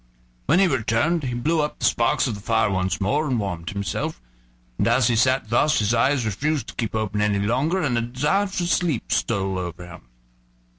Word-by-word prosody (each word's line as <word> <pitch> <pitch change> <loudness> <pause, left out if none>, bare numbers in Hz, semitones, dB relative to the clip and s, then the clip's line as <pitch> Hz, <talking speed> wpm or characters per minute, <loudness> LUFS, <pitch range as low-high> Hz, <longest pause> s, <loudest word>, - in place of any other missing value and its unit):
When - - +4
he 195 - +5
returned 140 - +1
he 125 -3 -3
blew 155 +7 +1
up 150 - -3
the - - -2
sparks 115 0 +2
of 120 - -2
the 100 - -8
fire 110 -1 +1
once 95 +2 -1
more, 145 +10 0
and 125 -4 0
warmed 90 -5 -4
himself. 100 -10 -3 0.6
And - - +2
as 125 -2 +3
he 120 - +2
sat 130 0 +2
thus 150 +5 +3
his 105 +1 +1
eyes 125 +2 +2
refused 140 +5 -1
to - - -10
keep 115 -2 -3
open 105 -1 -1
any 105 -1 +1
longer, 130 - 0
and 130 -5 0
a 115 - +1
desire 145 +12 0
to 185 -2 -3
sleep 170 -7 0
stole 95 -4 0
over 90 -1 -6
him. 85 -8 -13
115 Hz, 205 wpm, -23 LUFS, 100-145 Hz, 0.6 s, he